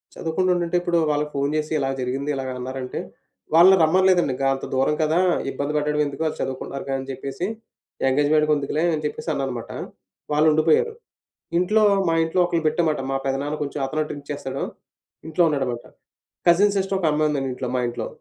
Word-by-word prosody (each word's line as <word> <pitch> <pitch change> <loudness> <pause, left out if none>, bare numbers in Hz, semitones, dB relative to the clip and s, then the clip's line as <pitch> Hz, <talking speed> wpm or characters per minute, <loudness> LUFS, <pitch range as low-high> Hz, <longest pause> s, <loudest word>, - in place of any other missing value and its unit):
చదువుకుంటుంటుంటే 175 +1 0
ఇప్పుడు 175 -1 +1
వాళ్ళకి 150 0 -1
ఫోను 140 +1 0
జేసి, 155 0 -2
ఇలా 135 -1 0
జరిగింది, 135 +3 -2
ఇలాగన్నారంటే 130 0 -4 0.6
వాళ్ళని 185 +3 +8
రమ్మనలేదండింగ. 175 -4 +3
గా 135 - +2
అంతా 135 - -5
దూరం 135 +3 +2
కదా! 155 +3 +2 0.3
ఇబ్బంది 145 +1 -3
పెట్టడడం 150 0 +1
ఎందుకు? 140 +2 -4
ఆళ్ళు 155 - -4
చదువుకుంటున్నారు 135 +1 -4
కదా! 135 0 -1
అని 135 - -9
చెప్పేసి 135 +6 -4 0.6
ఎంగేజ్‌మెంట్‌కెందుకులే 150 +1 +2
అని 155 0 -2
చెప్పేసి 150 - -4
అన్నాను 135 -2 -2
మాట. - - -10 0.6
వాళ్ళుండిపోయారు. 155 - +3 0.7
ఇంట్లో 215 +4 +3 0.2
మా 165 - +2
ఇంట్లో 165 +3 -1
ఒకల్ని 170 -2 -1
పెట్టామన్మాట, 155 -2 +1
మా 135 - +1
పెదనాన్న 140 +2 -1
కొంచెం 145 0 -5
అతనూ 155 +3 -2
డ్రింక్ 145 -1 -8
చేస్తాడు. 135 -2 -4 0.6
ఇంట్లో 165 +2 +2
ఉన్నాడన్నమాట. 130 -5 -2 0.6
కజిన్ 200 +4 +5
సిస్టర్ 195 0 0
ఒక 180 - -1
అమ్మాయుందండి 150 -3 0
ఇంట్లో 125 0 -4
మా - - +1
ఇంట్లో. 120 -1 -4
150 Hz, 160 wpm, -23 LUFS, 135-165 Hz, 0.7 s, వాళ్ళని